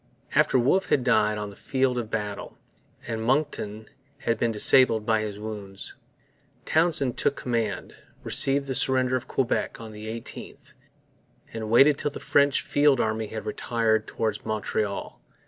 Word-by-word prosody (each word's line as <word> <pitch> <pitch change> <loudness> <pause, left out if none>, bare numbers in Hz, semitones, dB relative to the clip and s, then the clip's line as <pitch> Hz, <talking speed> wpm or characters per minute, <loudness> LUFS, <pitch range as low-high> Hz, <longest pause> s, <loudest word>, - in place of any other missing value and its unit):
After - - +3
Wolfe 140 +11 +2
had 130 - +2
died 110 -4 +2
on 105 -1 -5
the - - -14
field 130 +1 0
of 115 -2 -5
battle, 105 -2 -5 0.5
and 115 -1 -4
Monckton 110 -5 -1 0.3
had 115 -1 -1
been 115 - +1
disabled 110 0 +4
by 110 -1 +2
his 105 -2 -5
wounds, 105 -2 -6 0.7
Townshend 155 -6 +1
took 140 - +1
command, 115 -6 -3 0.3
received 140 +1 +2
the 135 - -3
surrender 130 0 +2
of 130 +1 -3
Quebec 130 -2 -1
on 115 -1 -9
the 105 0 -9
18th, 115 +1 -6 0.8
and 110 -1 -5
waited 135 +5 +5
till - - 0
the 145 - -8
French 140 -1 +3
field 145 -2 +3
army 110 0 -1
had 110 +1 -7
retired 110 0 0
towards 110 -2 -3
Montreal. 105 -1 -3
115 Hz, 150 wpm, -26 LUFS, 110-130 Hz, 0.8 s, waited